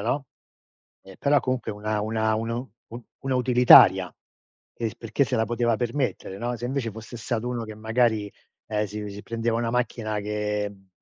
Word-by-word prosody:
no, 135 +6 -1 0.8
e 95 -1 -14
però 145 0 +4
comunque 130 -3 -2
una 105 +1 -2
una 110 0 0
una 115 +1 -2
u 125 +2 -4 0.2
u 120 +1 -9 0.2
una 135 -1 -1
utilitaria, 125 -1 +7 0.6
e 115 - -3
il 110 - -5
perché 115 +4 0
se 125 -1 -1
la 110 - +2
poteva 120 -1 0
permettere, 120 -5 -2
no, 120 +2 -2
se 120 - -7
invece 130 -2 -2
fosse 115 +3 -9
stato 120 +1 -2
1 120 -2 -3
che 110 -1 -8
magari, 110 -1 0 0.3
ehm, 105 -1 -1
si 105 +1 -6
si 100 +1 -9
prendeva 115 0 -1
una 115 0 -1
macchina 115 -3 -1
che, 105 0 -2
mhmm, 95 -1 -19
115 Hz, 185 wpm, -25 LUFS, 105-120 Hz, 0.8 s, utilitaria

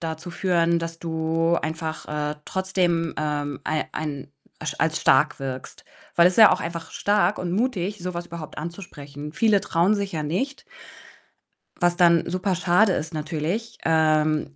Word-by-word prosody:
dazu 160 +1 -5
führen, 170 -2 +2
dass 165 0 -5
du 165 0 0
einfach, 160 0 -4
äh, 150 0 -2
trotzdem, 180 -3 0
ähm, 145 -2 -2
ei 155 -1 0
ein 145 -3 -5 0.3
as 150 -3 -3
als 160 0 +1
stark 150 -1 +4
wirkst, 130 -1 -7 0.3
weil 170 0 +6
es 180 - +4
ist - - -6
ja 220 - +10
auch - - 0
einfach 170 0 -5
stark 205 -1 +1
und 175 -1 -3
mutig, 205 -2 -1
so 180 0 -5
was 175 0 -4
überhaupt 165 -3 -8
anzusprechen. 150 -4 -8
Viele 215 -3 +3
trauen 185 0 +2
sich 200 -2 -3
ja 155 - -2
nicht 230 - -3 1.2
was 175 -1 +3
dann 170 -2 +4
super 185 +1 0
schade 185 +3 +3
ist 160 +1 -3
natürlich. 160 +9 -3
Ähm, 155 -2 +2
165 Hz, 160 wpm, -24 LUFS, 155-185 Hz, 1.2 s, ja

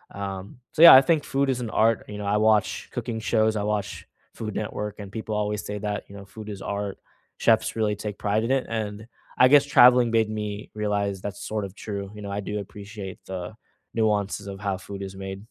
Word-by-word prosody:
Um, 100 +3 -6
so 155 - 0
yeah, 170 - +12
I 130 - +10
think 155 0 +2
food 140 0 0
is 125 - -2
an 115 - -4
art, 115 0 +2
you 105 - -7
know, 105 - -5
I 105 +1 +2
watch 110 0 +2
cooking 115 -2 -4
shows, 110 -1 +2
I 105 - -1
watch 105 -1 -3 0.3
Food 110 -2 -5
Network, 105 -1 -4
and 100 -1 -8
people 110 0 -4
always 105 0 -1
say 105 0 -4
that, 105 0 -3
you 100 - -11
know, 100 - -10
"Food 105 +2 -10
is 100 -1 -7
art." 100 -1 -3 0.4
Chefs 110 -1 +2
really 110 -2 +1
take 105 -1 -5
pride 105 +2 +1
in 130 - -1
it, 135 -1 +1
and, 110 -1 -4 0.3
I 125 - +9
guess 145 0 +7
traveling 125 -3 +6
made 110 -1 +2
me 105 -1 -5
realize 100 -2 -1
that's 100 0 -6
sort 110 -1 -2
of 95 - -9
true, 100 -3 -6
you 105 - -9
know, 100 - -6
I 100 - -2
do 105 +1 -4
appreciate 100 -1 -8
the 95 +1 -6 0.4
nuances 105 -2 0
of 95 -1 -7
how 100 -2 -1
food 100 +1 -8
is 95 0 -7
made. 95 0 -6
105 Hz, 225 wpm, -25 LUFS, 100-110 Hz, 0.4 s, yeah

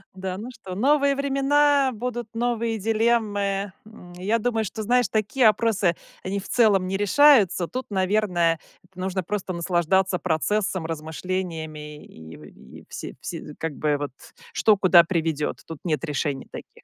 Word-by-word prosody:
Да, 185 -1 -4
ну 225 +5 -7
что? 220 -7 -9
Новые 280 +5 +3
времена, 280 0 +2
будут 240 0 -5
новые 230 -1 -1
дилеммы. 205 -3 0
М, 180 -5 -14
я 200 +6 -1
думаю, 225 -1 0
что, 220 +2 -5
знаешь, 245 +1 +2
такие 220 +4 +1
опросы, 210 -5 +2 0.3
они 195 +2 -2
в 195 - -9
целом 205 -6 +3
не 190 - -2
решаются. 205 - +4
Тут, 255 +6 -6
наверное, 185 -4 +1 0.3
это 185 0 -17
нужно 190 0 -2
просто 195 +1 -3
наслаждаться 180 +2 +1
процессом, 185 +1 -1
размышлениями 160 -2 -5
и 80 0 -13
в - - -24
все - - -6
все 150 - -7
как 160 -2 -3
бы 150 0 0
вот, 145 -2 -4 0.4
что 215 -2 +4
куда 185 -3 +6
приведет. 160 -4 -2
Тут 160 -3 -8
нет 160 -4 -1
решений 145 -2 -3
таких. - - -11
195 Hz, 150 wpm, -24 LUFS, 170-225 Hz, 0.4 s, куда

